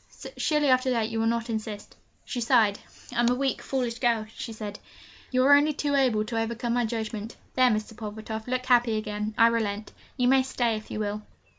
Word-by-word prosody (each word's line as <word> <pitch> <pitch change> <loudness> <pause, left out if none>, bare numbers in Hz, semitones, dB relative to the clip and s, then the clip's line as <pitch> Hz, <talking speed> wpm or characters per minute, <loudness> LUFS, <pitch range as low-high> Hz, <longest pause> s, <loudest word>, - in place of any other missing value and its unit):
Surely, 300 -2 +1
after 255 0 +3
that, 230 -3 +1
you 225 - -2
will 225 - +1
not 230 0 0
insist!' 215 -2 -5 0.3
She 245 - -4
sighed. 220 -3 +3 0.4
'I - - 0
am 240 0 +4
a 250 - +2
weak, 270 +1 -1
foolish 245 -3 -2
girl,' 235 -3 +1
she 230 - -6
said; 210 -2 -7 0.5
'you 255 -1 +2
are 285 - +7
only 295 +2 +5
too 290 0 -1
able 250 -6 +2
to 225 0 -1
overcome 235 +1 -2
my 245 -1 +1
judgment. 220 -1 -4 0.2
There, 255 -1 +5
Mr. 215 0 -2
Pulvertoft, 220 +1 -6
look 255 0 -1
happy 240 -3 +3
again 210 0 -3
I 230 - +7
relent. 220 -3 0 0.2
You 250 -1 +2
may 265 +1 +5
stay 245 -3 0
if 215 - -8
you - - -4
will!' 210 0 -2
230 Hz, 205 wpm, -27 LUFS, 215-255 Hz, 0.5 s, are